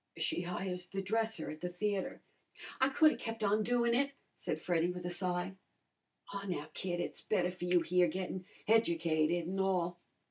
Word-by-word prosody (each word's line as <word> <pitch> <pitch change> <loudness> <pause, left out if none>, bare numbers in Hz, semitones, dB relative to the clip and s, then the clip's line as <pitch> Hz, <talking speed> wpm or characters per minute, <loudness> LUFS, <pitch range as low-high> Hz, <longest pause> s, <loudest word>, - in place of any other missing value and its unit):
"She - - 0
hires 180 0 -3
the 195 +1 -3
dresser 220 -4 0
at 155 - -9
the 180 - -2
theatre." 195 +2 -2 0.6
"I 265 - +5
could 310 +3 +6
'a' - - -2
kep' 225 -1 -4
on 210 +1 +3
doin' 235 +1 +2
it," 280 +3 +2 0.2
said - - -3
Freddy, 175 -1 +1
with 180 0 -5
a 175 - -1
sigh. 180 +1 -1 0.8
"Aw, 200 0 -4
now, 175 -5 -3
kid, 175 -2 -2
it's - - -3
better 180 -4 +1
for 180 -1 -6
you 180 -1 +4
here, 180 +1 +4
gettin' 185 +2 -3 0.2
educated 170 -6 +3
an' 190 +2 -2
all." 180 -2 +1
180 Hz, 180 wpm, -34 LUFS, 175-210 Hz, 0.8 s, could